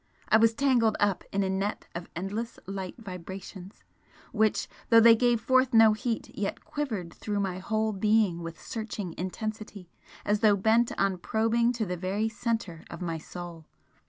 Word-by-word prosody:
I 220 - +6
was 225 0 +4
tangled 240 -5 +3
up 205 -2 +1
in 200 0 +1
a 190 - -1
net 195 +2 -2
of 170 0 -7
endless 205 +7 -4
light 190 -1 -5
vibrations 190 -1 -9 0.5
which, 220 -1 +1 0.2
though 230 - +8
they 230 0 +8
gave 240 0 +2
forth 260 +1 +2
no 225 -1 +7
heat, 225 +1 -3
yet 200 -1 -3
quivered 220 - -4
through 205 -1 -3
my 190 -2 -2
whole 220 +2 -1
being 205 -3 +2
with 165 0 -7
searching 215 -5 -5
intensity 205 0 -6 0.3
as 210 0 +2
though 210 -1 +5
bent 225 +4 +3
on 195 -2 +1
probing 225 +5 +1
to 230 -2 -2
the 180 -1 -3
very 195 +5 -1
centre 220 -7 -3
of - - -8
my 165 -3 -3
soul! 170 -1 -9
210 Hz, 165 wpm, -28 LUFS, 185-225 Hz, 0.5 s, though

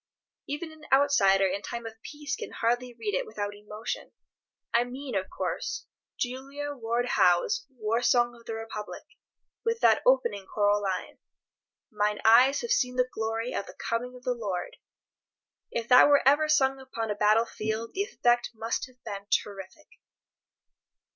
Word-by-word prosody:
Even 315 +3 -4
an 310 -1 -14
outsider 235 -9 +5
in 190 +1 -1
time 235 +1 -6
of 225 0 -9
peace 295 +1 -5
can - - -7
hardly 245 +2 0
read 225 -3 -4
it 185 - -1
without 205 -1 -4
emotion. 210 +1 -6 0.6
I 235 - +4
mean, 255 +2 -7
of 190 -2 -1
course, - - -3 0.3
Julia 275 +3 -4
Ward 240 -1 -1
Howe's 250 - +2
"War 230 -2 -1
Song 240 -1 +3
of 235 -1 -18
the 225 - -3
Republic," 225 -1 -7 0.6
with 460 0 -1
the - - +5
choral - - -3
opening 200 - -5
line: 205 -2 0 0.7
"Mine 210 -1 0
eyes 250 +5 +6
have 475 - -4
seen 250 - +2
the 250 0 +1
glory 225 +2 -2
of 200 - -3
the - - -11
coming 245 +2 -3
of 250 - -13
the 250 -2 0
Lord." 200 -7 -4 0.9
If 235 -1 -3
that 250 +2 +8
were 285 -2 +4
ever 300 +3 +4
sung 270 -3 +3
upon 230 -4 -4
a - - -1
battle 215 +2 +4
field 220 0 -4
the 390 - -1
effect 240 - +1
must 225 +3 -2
have 255 -1 -23
been 200 -1 -6
terrific. 200 +9 -2
235 Hz, 160 wpm, -28 LUFS, 210-265 Hz, 0.9 s, that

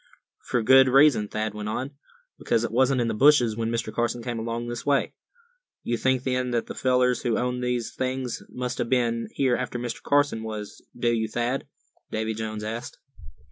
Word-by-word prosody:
"For 120 - -1
a - - -4
good 130 +3 +7
reason," 135 -5 +5
Thad 110 0 -3
went 105 0 -5
on; 130 +5 -3 0.5
"because 115 - +1
it - - -2
wasn't 130 +2 +3
in 120 - 0
the 115 - -1
bushes 125 -2 +5
when 115 0 -2
Mr. 115 -2 -2
Carson 120 +1 -1
came 120 -1 -3
along 115 +1 -3
this 120 0 -5
way." 140 -1 +1 0.7
"You 120 - -1
think, 130 +1 +1
then, 125 -1 0
that 120 -2 0
the - - -7
fellers 125 -1 +2
who 120 -3 0
owned 125 0 -1
these 125 -2 -2
things 130 -1 -3
must 125 0 -4
have 115 - -1
been 115 -2 +1
here 130 -3 +2
after 125 0 -3
Mr. 120 -1 -5
Carson 145 -5 +2
was, 110 -2 -7 0.2
do 120 -1 +1
you, 110 -1 0
Thad?" 120 +4 -2 0.4
Davy 110 0 -2
Jones 110 -1 -5
asked. 115 +3 -5
120 Hz, 195 wpm, -25 LUFS, 115-130 Hz, 0.7 s, good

